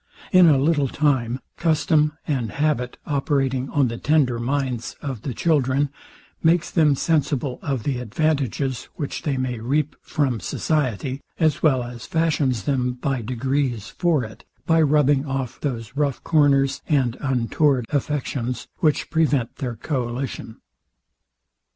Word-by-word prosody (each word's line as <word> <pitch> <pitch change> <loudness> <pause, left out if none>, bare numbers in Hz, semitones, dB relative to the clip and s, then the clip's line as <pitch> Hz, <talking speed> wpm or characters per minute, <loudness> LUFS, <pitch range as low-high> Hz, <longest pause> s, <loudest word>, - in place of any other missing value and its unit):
In 185 -2 +7
a 150 -4 +6
little 145 0 +2
time, 130 -4 0 0.2
custom 155 -2 +2
and 125 -7 -1
habit 140 -5 0
operating 135 -2 0
on 140 -3 +2
the 115 0 -5
tender 140 -6 +2
minds 125 -1 -2
of 135 -7 -5
the 135 - -4
children, 140 -3 +2 0.5
makes 170 +1 +2
them 155 -4 +4
sensible 140 -4 0
of 135 -6 -2
the 135 -4 -1
advantages, 135 0 -1
which 145 - -4
they 140 -3 -1
may 125 -2 -2
reap 140 +6 0
from 130 -6 -1
society, 135 - -1 0.2
as 155 -4 +2
well 135 -6 +3
as 120 -2 -8
fashions 150 - +1
them 125 -1 0
by 125 0 -2
degrees 125 -1 -1
for 170 -7 +1
it, 110 -1 -10 0.2
by 165 0 +4
rubbing 145 -1 +3
off 135 -2 -3
those 115 -5 -4
rough 140 -3 -1
corners 140 -3 +3
and 130 -6 +2
untoward 130 0 +1
affections, 135 -4 -2
which 150 -2 +1
prevent 145 -7 +1
their 125 -5 -3
coalition. 125 -3 -4
135 Hz, 135 wpm, -23 LUFS, 125-150 Hz, 0.5 s, In